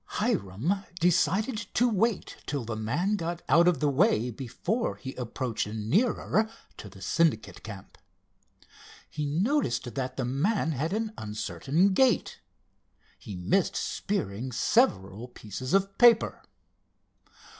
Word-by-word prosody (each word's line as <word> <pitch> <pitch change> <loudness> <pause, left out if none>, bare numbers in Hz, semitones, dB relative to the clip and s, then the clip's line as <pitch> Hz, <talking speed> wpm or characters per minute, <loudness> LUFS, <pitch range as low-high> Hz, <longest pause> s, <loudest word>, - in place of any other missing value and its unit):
Hiram 125 - 0 0.2
decided 185 +7 +2 0.2
to 245 - +4
wait 225 -1 0
till 140 -5 -2
the 110 -1 -4
man 150 - 0
got 170 -1 -4
out 170 +5 +5
of 175 -6 +3
the 150 - +3
way 140 - +2
before 140 - -2
he 130 -2 -8
approached 125 -2 -3
nearer 200 - +1 0.3
to 105 - -9
the 95 0 -12
Syndicate 165 -8 +1
camp. 105 -3 -10 1.1
He 150 -1 -4
noticed 160 - 0
that 130 -2 -4
the 130 - -1
man 160 - 0
had 155 +4 -2
an 220 +1 -2
uncertain 140 - 0
gait. 250 -1 +2 0.8
He 100 - -8
missed 95 - +1
spearing 125 - -2
several 115 - +1
pieces 125 +2 -7
of 195 0 +2
paper. 235 -2 +5
150 Hz, 125 wpm, -28 LUFS, -, 1.1 s, out